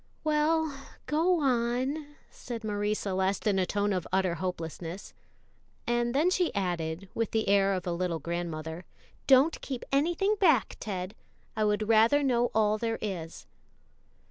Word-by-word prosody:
"Well, 310 0 +1 0.3
go 335 +4 +2
on," 265 +4 0 0.2
said 235 -2 -7
Marie 210 0 -1
Celeste 190 -1 -1
in 200 -3 +2
a 185 - +1
tone 205 +1 0
of 180 -3 -2
utter 190 -2 +1
hopelessness; 170 +1 -5 0.7
and 240 +1 0
then 320 +6 +3
she 365 -2 +1
added, 175 -2 -2
with 230 -2 -1
the 220 -1 -1
air 195 0 +3
of 185 - -4
a 175 - -1
little 170 -1 -1
grandmother, 165 +1 -5 0.4
"don't 275 +4 +5
keep 260 -3 -5
anything 345 +9 +2
back, 315 - +3
Ted; 190 -2 -4 0.4
I 215 0 +1
would 210 0 0
rather 230 +6 +5
know 245 -3 +2
all 215 -1 +2
there 225 0 -1
is." 175 -6 -5
215 Hz, 145 wpm, -29 LUFS, 185-270 Hz, 0.7 s, don't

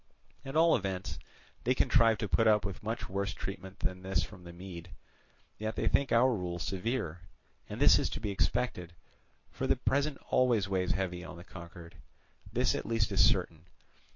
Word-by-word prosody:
At 135 +2 -7
all 165 +1 +5
events 95 -3 -3 0.4
they 125 +2 +2
contrived 115 -4 +4
to 105 - -1
put 115 +3 +3
up 105 -2 +4
with 95 -2 -4
much 110 +1 -3
worse 100 0 -2
treatment 95 -1 -7
than 90 0 -2
this 95 0 0
from 95 -3 -10
the 85 - -8
Mede, 90 -1 -9 0.7
yet 110 +1 -3
they - - -1
think 140 - +2
our 125 +2 +5
rule 90 -4 -3
severe, 95 -1 -2 0.5
and - - -6
this - - +7
is - - 0
to - - -5
be 105 -2 -2
expected, 90 -4 -1 0.6
for - - -3
the - - +4
present 140 +1 0
always 120 -6 +3
weighs 95 -2 0
heavy 90 -2 -3
on 90 - -9
the 85 - -10
conquered. 85 -1 -11 0.5
This 125 +3 +2
at - - -3
least 115 -2 +1
is 100 - +4
certain. 90 -5 +1
95 Hz, 180 wpm, -31 LUFS, 90-115 Hz, 0.7 s, this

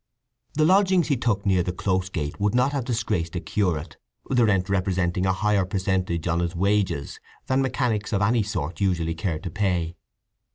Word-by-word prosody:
The 155 +1 +3
lodgings 185 -1 +4
he 140 - +3
took 115 -5 -1
near 95 -2 +3
the 90 - -1
Close 95 0 -1
Gate 75 -4 -4
would 105 +2 +1
not 125 +3 +3
have 140 -4 -2
disgraced 100 -9 -1
a - - 0
curate, 90 -6 -2 0.3
the 125 -3 +3
rent 95 -4 +2
representing 95 -1 0
a - - +3
higher 105 0 +1
percentage 95 -3 -1
on 85 0 +1
his 85 0 -2
wages 95 -5 0 0.3
than 130 +1 +1
mechanics 120 -5 -1
of 100 -1 +1
any 115 +2 +3
sort 90 -5 -4
usually 85 -4 +1
care 80 -1 -2
to 90 +1 -6
pay. 90 -4 -1
95 Hz, 180 wpm, -24 LUFS, 85-110 Hz, 0.3 s, lodgings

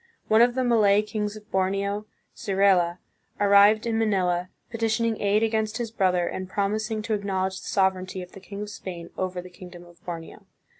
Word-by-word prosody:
One 220 +1 +6
of 240 0 +4
the 260 - +1
Malay 210 -4 +4
kings 210 -1 -3
of 210 0 -14
Borneo, 200 +2 -1 0.3
Sirela, 190 -3 +2 0.4
arrived 205 +2 +5
in 225 -1 0
Ma 225 - +2
nila, 180 -3 0 0.2
petitioning 225 0 0
aid 205 +2 +2
against 220 -1 0
his 235 -2 -4
brother, 185 -5 +1
and 185 +1 -5
promising 215 +2 -1
to 225 - -2
acknowledge 190 -2 -2
the - - -10
sovereignty 185 -1 0
of 180 - -13
the - - -11
king 200 +2 -7
of 210 - -7
Spain 175 -4 -8
over 185 -1 -3
the 180 - -11
kingdom 180 -1 -12
of 175 -1 -20
Borneo. 165 -2 -8
200 Hz, 185 wpm, -25 LUFS, 185-215 Hz, 0.4 s, One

